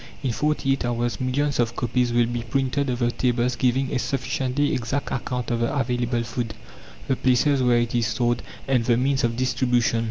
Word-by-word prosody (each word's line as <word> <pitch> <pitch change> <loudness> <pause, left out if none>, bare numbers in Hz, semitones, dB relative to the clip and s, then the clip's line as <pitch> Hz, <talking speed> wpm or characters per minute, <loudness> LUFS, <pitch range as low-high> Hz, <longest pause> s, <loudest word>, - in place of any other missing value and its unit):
In 130 - 0
forty 150 +2 0
eight 135 - 0
hours 120 +1 -1
millions 135 +2 0
of 120 -1 +1
copies 120 0 0
will 120 0 +3
be 120 0 -3
printed 135 +3 -1
of 125 - -1
the 120 -1 +1
tables 125 0 0
giving 130 +1 +1
a - - +1
sufficiently 135 +2 -1
exact 130 +2 -2
account 125 -1 -3
of 120 - 0
the 115 - 0
available 120 -2 0
food, 115 -1 -4 0.5
the 130 - +2
places 130 +2 +2
where 125 -1 +4
it 120 -1 0
is 120 -2 +1
stored, 120 0 0 0.3
and 130 -3 +2
the 115 0 +2
means 135 +2 +1
of 115 -1 0
distribution. 125 -2 +1
125 Hz, 195 wpm, -24 LUFS, 120-130 Hz, 0.5 s, where